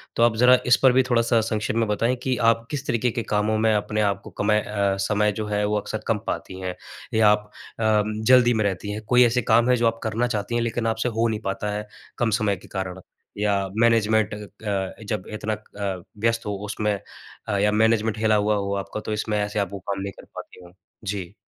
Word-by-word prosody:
तो 115 - +3
आप 120 -1 +4
ज़रा 125 +2 +6
इस 125 +1 +5
पर 130 - +7
भी 130 +1 +4
थोड़ा-सा 115 -1 +3
संक्षेप 110 -1 -2
में 115 -1 +1
बताएँ 115 +4 +1
कि 130 -1 +1 0.2
आप 115 0 -3
किस 145 -2 -3
तरीक़े 120 -1 +1
के 120 0 -3
कामों 105 +1 0
में 110 0 +3
अपने 105 0 0
आप 100 -1 0
को - - -10
कमय 105 +1 +3
अ, 100 -2 -1
समय 105 0 +2
जो 105 +1 -4
है, 105 0 0
वो 105 0 0
अक्सर - - -5
कम - - +2
पाती 95 - -4
हैं 90 -1 -4 0.4
या 110 -1 +5
आप 105 0 +1 0.3
अ, 110 -1 +3
जल्दी 120 +3 +4
में 110 -1 +1
रहती 100 +1 -2
हैं। 105 +1 -5
कोई 125 0 +6
ऐसे 120 +1 +2
काम 115 +2 +3
हैं, 125 - +5
जो 115 -1 +2
आप 115 0 -1
करना 115 +2 0
चाहती 110 0 -2
हैं 120 - +1
लेकिन 115 0 -1
आपसे 115 +2 0
हो 115 0 +1
नहीं 110 -2 -2
पाता 100 +1 -2
है, 105 0 -5 0.3
कम 120 - +1
समय 105 -2 +2
के - - -16
कारण? 95 -1 -5 0.4
या 100 -1 +1
मैनेजमेंट 110 -2 +3
अ, 105 0 -7 0.6
जब 105 -2 -3
इतना 110 0 -2
अ, 100 -3 -5 0.2
व्यस्त 115 0 +1
हो 105 - -2
उसमें 105 0 -1 0.5
अ, 100 -2 0
या 105 +1 +2
मैनेजमेंट 110 0 +2
हिला 110 0 +2
हुआ 105 0 +2
हो 100 -1 -2
आपका, 100 - -6
तो 110 - -4
इसमें 105 0 -1
ऐसे 105 0 -1
आप 100 -2 -1
वो 100 - -5
काम 95 +1 -4
नहीं 100 0 -4
कर - - -12
पाती - - -10
हों? 90 - -15 0.3
जी। 95 -2 -4
110 Hz, 230 wpm, -24 LUFS, 105-115 Hz, 0.6 s, पर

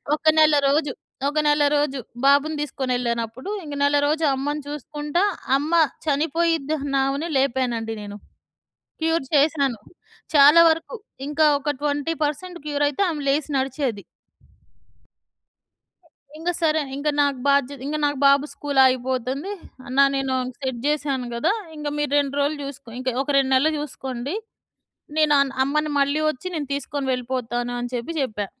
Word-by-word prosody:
ఒక 310 - -15
నెలరోజు. 290 -1 +3 0.4
ఒక 300 - -5
నెలరోజు 290 -2 +2 0.3
బాబుని 285 +2 +4
తీసుకొనెళ్ళా‌నప్పుడు, 245 - -3 0.2
ఇంక 295 - -7
నెలరోజు 290 +2 +2
అమ్మని 290 +2 -3
చూసుకుంటా 295 +4 -2 0.3
అమ్మ 305 +4 -3 0.3
చనిపోయిద్దన్నామెను 290 -1 0
లేపానండి 240 -4 -1
నేను. 205 0 -8 0.8
క్యూర్ 325 -3 +1
చేసినాను. 280 -4 +2 0.6
చాలా 295 +4 +8
వరకు 325 +9 -1 0.3
ఇంకా 305 +1 +2
ఒక 295 - -3
20% 300 +4 -2
క్యూరయితే 290 +2 0
ఆమె 300 -3 -3
లేసి 290 +2 +1
నడిచేది. 260 -5 -2 2.4
ఇంగసరే, 325 -2 0
ఇంగ 285 +2 -2
నాకు 280 -2 0
బాధ్య 280 0 +2
ఇంగ 300 +2 -2
నాకు 290 -2 -1
బాబు 280 +1 +5
స్కూలాగిపోతుంది. 260 - +1 0.3
అన్నా 270 +3 +4
నేను 270 -1 -1 0.2
సెట్ 260 -4 -4
చేశాను 280 -4 -1
గదా! 235 +12 +1 0.2
ఇంగ 295 -1 -4
మీరు 295 -1 -1
2 280 -1 -1
రోజులు 290 +1 0
చూసుకో. 275 -3 -10
ఇంక 260 0 -3
ఒక 280 - -13
2 265 -1 +1
నెల్లు 305 +4 +3
చూసుకోండి. 265 0 -5 0.8
నేను 305 -1 +4
అన్ 275 -1 0
అమ్మని 300 +2 0
మళ్ళీ 280 +2 +2
వచ్చి 310 +5 -5
నేను 290 -3 -3
తీసుకొని 285 0 -3
వెళ్ళిపోతాను 245 -1 -3
అని 245 - -4
చెప్పి 245 +6 -3
చెప్పా. 210 -5 -2
285 Hz, 125 wpm, -23 LUFS, 265-300 Hz, 2.4 s, చాలా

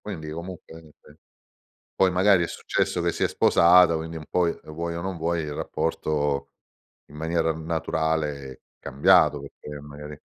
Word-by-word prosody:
Quindi 80 -7 -7
comunque 85 0 -9
niente. 75 -1 -20 0.8
Poi 95 -1 +3
magari 90 0 +4
è - - -2
successo - - -1
che - - +1
si - - -2
è - - +3
sposata, 85 0 +5
quindi 80 +1 -5
un 75 - -9
poi, 90 -2 +2
e - - -14
vuoi 85 +2 -4
o 85 - -4
non 95 0 -4
vuoi, 85 +1 -1
il 75 -1 -5
rapporto 75 -3 -2 0.6
in 75 - -14
maniera 80 +1 0
naturale 80 -3 -2
è - - -18 0.2
cambiato, 70 +2 +3
perché 75 +1 -10
magari 75 +1 -10
80 Hz, 160 wpm, -25 LUFS, 75-85 Hz, 0.8 s, sposata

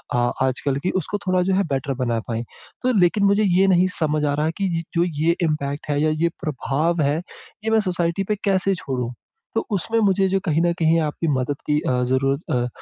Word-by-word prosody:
आ 120 0 +2 0.2
आजकल 135 +1 -1
की, 185 - +1
उसको 190 +3 -2
थोड़ा 185 0 +3
जो 190 - +3
है 200 - +2
बेटर 135 +1 -1
बना 115 -2 0
पाएँ। 115 0 -2 0.4
तो 255 0 +2
लेकिन 190 +3 +3
मुझे 200 +2 +3
ये 190 0 +3
नहीं 185 0 +4
समझ 155 -1 +1
आ 145 - +1
रहा 150 +1 0
है 160 - +1
कि 195 - +1
य - - -5
जो 170 - +4 0.2
ये 170 +1 +3
इम्पैक्ट 150 -2 -2
है 145 0 +1
या 155 - +3
ये 170 - +4
प्रभाव 155 +3 0
है, 145 +2 +2 0.5
ये - - +1
मैं 220 - +4
सोसाइटी 175 -1 0
पे 210 - +2
कैसे 195 0 +2
छोड़ूँ? 125 -6 -4 0.4
तो - - 0
उसमें 225 +4 0
मुझे 195 -2 +3
जो 195 - +1
कहीं 160 -1 +2
न 175 0 +3
कहीं 165 +1 +3
आपकी 155 +2 -2
मदद 140 0 -1
की 150 0 +3
अ, 125 -1 +1
ज़रूरत 135 +4 0
अ, 120 0 +1
160 Hz, 225 wpm, -22 LUFS, 140-185 Hz, 0.5 s, नहीं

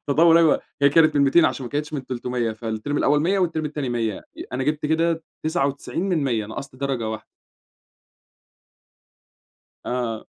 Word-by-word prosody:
تطور 165 +3 +5
أيوة، 165 -3 +4 0.2
هي 140 - +7
كانت 155 0 +4
من 140 - +4
200 140 +4 +5
عشان 135 - 0
ما - - -8
كانتش 150 +1 -3
من 135 -3 -4
300 125 -2 -2
فالتيرم 110 +5 -4
الأول 145 +1 +3
100 185 +5 +2
ي - - +1
والتيرم 160 -4 0
التاني 150 -3 -3
100 115 -4 -2 0.3
أنا 130 +1 -2
جِبت 150 0 -1
كده 165 +1 +1 0.2
99 150 +1 -1
من 165 -6 +1
100 115 -5 -1
نقصت 130 +4 -8
درجة 130 -4 -2
واحدة. 110 0 -6 2.6
آه. 120 -3 -3
140 Hz, 160 wpm, -23 LUFS, 120-155 Hz, 2.6 s, هي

